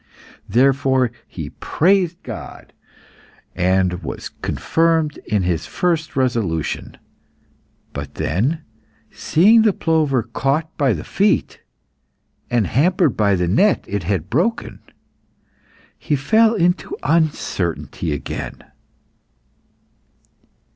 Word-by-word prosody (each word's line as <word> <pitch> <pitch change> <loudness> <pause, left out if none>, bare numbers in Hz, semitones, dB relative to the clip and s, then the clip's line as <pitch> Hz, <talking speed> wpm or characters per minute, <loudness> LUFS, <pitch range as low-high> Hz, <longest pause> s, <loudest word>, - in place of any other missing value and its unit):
Therefore 130 +1 +3 0.2
he 80 -5 -7
praised 180 0 +1
God, - - -9 0.8
and 90 0 +1
was - - -6
confirmed 165 -2 +1
in 105 -4 +1
his 90 -2 -1
first 165 -3 -1
resolution. 115 - -1 1.0
But - - -7
then 130 - -1 0.5
seeing 210 +8 +4
the 215 -2 +3
plover 155 -9 +1
caught 135 +7 -2
by 135 -5 +2
the 80 - -5
feet, - - 0 0.9
and 120 -4 +2
hampered 160 - +2
by 100 -2 +2
the 90 -1 0
net 190 - +2
it 100 0 -2
had 90 -1 -2
broken, 180 - -1 1.2
he 150 - 0
fell 220 - +3
into 180 - 0
uncertainty 95 - -1
again. 75 - -5
135 Hz, 95 wpm, -20 LUFS, -, 1.2 s, seeing